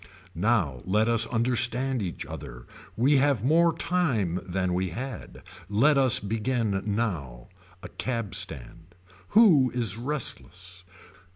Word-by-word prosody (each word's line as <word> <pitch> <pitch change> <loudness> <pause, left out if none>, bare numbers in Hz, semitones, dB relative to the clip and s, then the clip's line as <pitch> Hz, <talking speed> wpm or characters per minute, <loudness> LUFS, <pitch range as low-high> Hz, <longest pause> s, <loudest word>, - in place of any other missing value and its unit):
Now 85 - 0
let 105 +4 +1
us 115 -1 +3
understand 125 +1 0
each 90 -4 -5
other. - - -9 0.3
We 135 +5 +4
have 135 -5 +2
more 165 +5 +4
time 125 - 0
than 90 0 -1
we 90 +1 -1
had. 125 +7 -7 0.3
Let 130 +9 +3
us 130 -2 +4
begin 110 -1 -1
now. 85 - -3 0.3
A - - -6
cab 115 -6 -4
stand. 80 +7 -3 0.4
Who 160 - +6
is 115 -5 +1
restless. 95 - -5
115 Hz, 120 wpm, -26 LUFS, 95-130 Hz, 0.4 s, Who